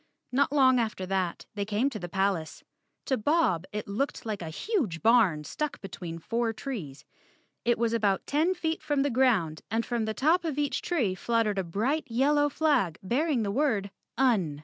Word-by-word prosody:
Not 275 +2 +2
long 260 -3 +5
after 215 -5 -2
that 185 -2 -2
they 205 -1 -2
came 215 +5 0
to 215 - -5
the 175 - -6
palace. 190 -4 -1 0.4
To 265 - +1
Bob 215 - +2
it 210 0 -4
looked 230 +8 -2
like 215 -3 -3
a 165 - -5
huge 215 - -2
barn 220 -10 +4
stuck 300 - -4
between 175 -4 -7
four 230 +6 -1
trees. 195 - -6 0.6
It 240 0 +3
was 235 0 0
about 205 -4 +1
ten 320 +6 +1
feet 325 -2 -2
from 290 -2 +1
the 285 - 0
ground 225 -11 +2
and 225 +2 0
from 235 -3 -1
the 220 0 -3
top 320 - +3
of 315 -4 -3
each 290 -1 0
tree 260 - 0
fluttered 215 +1 0
a - - 0
bright 225 - -1
yellow 290 +5 +2
flag 275 - +1
bearing 255 - +1
the 200 - -1
word, 215 -6 0 0.3
UN. 200 - +2
230 Hz, 185 wpm, -28 LUFS, 195-280 Hz, 0.6 s, long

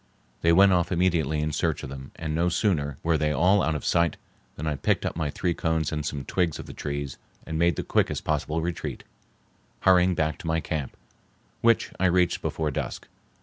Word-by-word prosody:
They 85 - +4
went 95 +3 +6
off 90 0 +1
immediately 85 -4 +1
in 75 0 -1
search 80 0 -1
of - - -5
them, 65 0 -8
and 80 -1 -4
no 85 +3 +2
sooner 80 -7 0
were 80 -2 +2
they 75 -1 +1
all 90 +7 +4
out 80 - 0
of 75 - -4
sight 85 -2 +2 0.4
than 75 - -6
I 75 - 0
picked - - 0
up - - -2
my 80 -2 -1
three 85 +4 -1
cones 80 -2 -1
and 75 -1 -2
some 70 -2 -4
twigs 85 -1 0
of - - -8
the - - -9
trees 70 -2 -4 0.3
and 80 -1 -3
made 85 +1 +3
the - - -3
quickest - - 0
possible 75 +1 -1
retreat, 85 0 -4 0.8
hurrying 90 -1 +5
back 80 -1 -1
to 90 - -7
my 80 0 +1
camp, 80 -4 -4 0.6
which 115 -1 +3
I 95 - +4
reached 90 0 +2
before 80 -2 -2
dusk. - - -4
80 Hz, 205 wpm, -26 LUFS, 75-85 Hz, 0.8 s, went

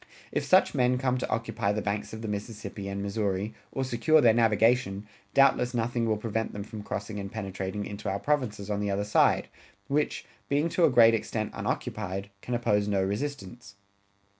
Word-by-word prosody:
If - - -1
such - - +4
men 125 0 +2
come 130 0 0
to - - -3
occupy 115 -3 -1
the 105 +1 -1
banks 105 +1 -2
of 110 +1 -7
the - - -3
Mississippi 105 -1 -5
and 100 0 -3
Missouri, 100 0 -1 0.2
or 135 - -2
secure 130 +5 +3
their 120 -6 +6
navigation, 110 -2 +2 0.3
doubtless 125 -3 +4
nothing 115 0 0
will 110 -1 +1
prevent 110 +1 -2
them 100 - -5
from 110 0 -8
crossing 105 +1 -5
and 100 0 -6
penetrating 100 -1 -4
into 100 0 -5
our 95 - -1
provinces 110 -6 -1
on 100 - 0
the 105 0 -1
other 100 +1 0
side, 105 - +3 0.4
which, 145 +1 0 0.2
being 145 +4 +2
to 170 0 +3
a - - +5
great 115 -3 +6
extent 110 -1 -2
unoccupied, 100 -1 -3
can 125 - -3
oppose 105 -4 +1
no 100 -2 +1
resistance. 105 -1 -4
110 Hz, 185 wpm, -28 LUFS, 100-120 Hz, 0.4 s, their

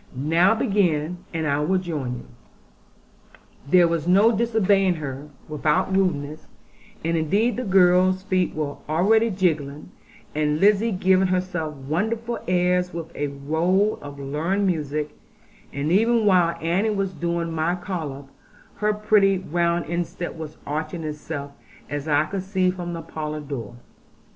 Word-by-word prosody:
Now 165 - +3
begin; 180 -6 +1
and 160 -2 -2
I 140 -1 +1
will 175 +6 +1
join 150 -9 -3
you.' 120 - -10 1.4
There 175 +1 +6
was 165 -1 -1
no 205 +5 +5
disobeying 200 -4 +2
her, 145 -1 -6 0.2
without 150 +4 0
rudeness; 155 -5 -1 0.6
and 165 0 +1
indeed 200 +10 +1
the 255 - -3
girls' 185 -1 +4
feet 185 -2 0
were 150 -2 -3
already 220 +8 +3
jigging; 155 -7 -1 0.4
and 150 0 0
Lizzie 210 +4 +4
giving 190 0 +3
herself 180 -4 -2
wonderful 220 - -2
airs 180 0 +2
with 165 -1 -7
a 145 - -1
roll 160 +9 0
of 145 0 -9
learned 155 +9 -1
music; 150 -4 -1 0.6
and 145 +3 -2
even 225 +3 +3
while 180 -4 +3
Annie 175 +7 +1
was 195 -3 -1
doing 170 -1 -2
my 165 +2 0
collop, 160 -7 -5 0.5
her 210 0 +1
pretty 210 -2 +3
round 170 -1 0
instep 175 +1 -3
was 155 -2 -8
arching 155 +3 -3
itself, 150 -1 -5 0.4
as 145 +1 -3
I 150 0 +3
could 195 +3 -4
see 185 -1 +1
from 175 -1 -5
the 165 -1 -5
parlour 155 -1 -5
door. 130 -6 -6
170 Hz, 140 wpm, -23 LUFS, 150-190 Hz, 1.4 s, There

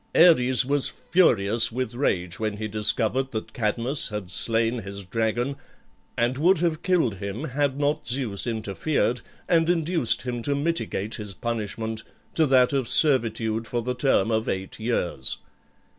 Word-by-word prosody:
Ares 130 -7 +5
was 140 0 +1
furious 115 - +2
with 125 0 -3
rage 90 -9 -1
when 110 -2 -2
he 110 0 -3
discovered 110 +5 0
that 110 - -5
Cadmus 120 +5 0
had 105 -4 -6
slain 115 +3 +1
his 100 0 -7
dragon, 115 +7 -1 0.6
and 120 +3 0
would 180 +5 +4
have 160 -1 -1
killed 165 - +1
him 100 +6 -5
had 140 -1 -1
not 145 +1 0
Zeus 120 -4 0
interfered, 115 +3 -1 0.3
and 165 -1 +3
induced 165 -6 +1
him 120 -2 -4
to 140 +4 -1
mitigate 140 - -2
his 105 -3 -5
punishment 110 0 -4 0.3
to 160 -2 +2
that 130 -1 +4
of 135 -4 0
servitude 115 -6 +2
for 120 -1 -2
the 125 +2 -2
term 125 -4 +1
of 110 0 0
eight 95 +2 -4
years. 90 - -1
120 Hz, 150 wpm, -25 LUFS, 110-140 Hz, 0.6 s, Ares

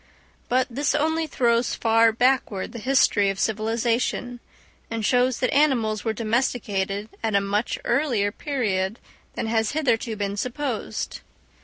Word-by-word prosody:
But 255 +1 +3
this 280 +4 -1
only 320 +2 +1
throws 235 -4 +1
far 225 0 +4
backward 235 -4 +1
the 235 - -7
history 210 -4 +3
of 195 0 -3
civilisation, 230 +3 -1 0.5
and 225 -2 -3
shows 250 +1 +2
that 255 - 0
animals 240 -8 +2
were 225 - 0
domesticated 215 -3 -1
at 220 -2 0
a - - +6
much 200 +3 -1
earlier 235 -9 +1
period 215 -7 -2 0.4
than - - -2
has 220 -1 0
hitherto 240 -7 0
been 200 -1 -3
supposed. 250 +1 -3
230 Hz, 135 wpm, -24 LUFS, 215-255 Hz, 0.5 s, a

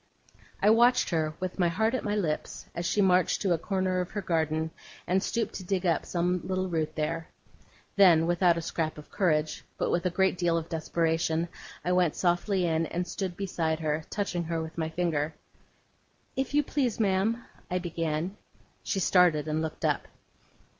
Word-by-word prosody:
I 210 - +7
watched 240 +1 +4
her, 155 -2 0
with 185 0 -4
my 175 - +4
heart 220 +7 +1
at 255 - -1
my 205 0 -1
lips, 165 -7 -2
as 170 0 -2
she 205 - +2
marched 185 -1 +3
to 190 -3 +3
a 165 - 0
corner 185 0 0
of 180 - -4
her 205 - -4
garden, 160 -2 0 0.3
and 190 +2 +2
stooped 230 +3 -1
to 190 - -8
dig 185 0 -1
up 170 -2 +1
some 180 0 0
little 185 0 -1
root 160 -3 -2
there. 160 +1 -2 0.7
Then, 170 -5 +7
without 175 0 +3
a 170 - -3
scrap 160 -1 -2
of 150 - -12
courage, 155 -6 +1
but - - 0
with 175 - +1
a - - +1
great 190 0 +1
deal 170 -2 +2
of 165 0 -4
desperation, 165 0 0 0.4
I 180 - +1
went 180 -3 +3
softly 180 +1 +1
in 165 -1 +1
and 175 +1 -2
stood 185 -1 -4
beside 165 -5 -1
her, 155 0 -1
touching 180 -4 -2
her 165 0 -2
with 160 0 -6
my 160 -1 -2
finger. 160 -2 -1 1.0
'If 270 +2 -1
you 295 - +4
please, 265 -6 -1
ma'am,' 215 +3 +1 0.2
I 180 - 0
began. 165 +1 -2 0.5
She 195 - -1
started 170 -5 +4
and 155 +1 0
looked 160 -1 -3
up. - - 0
175 Hz, 185 wpm, -28 LUFS, 160-190 Hz, 1.0 s, I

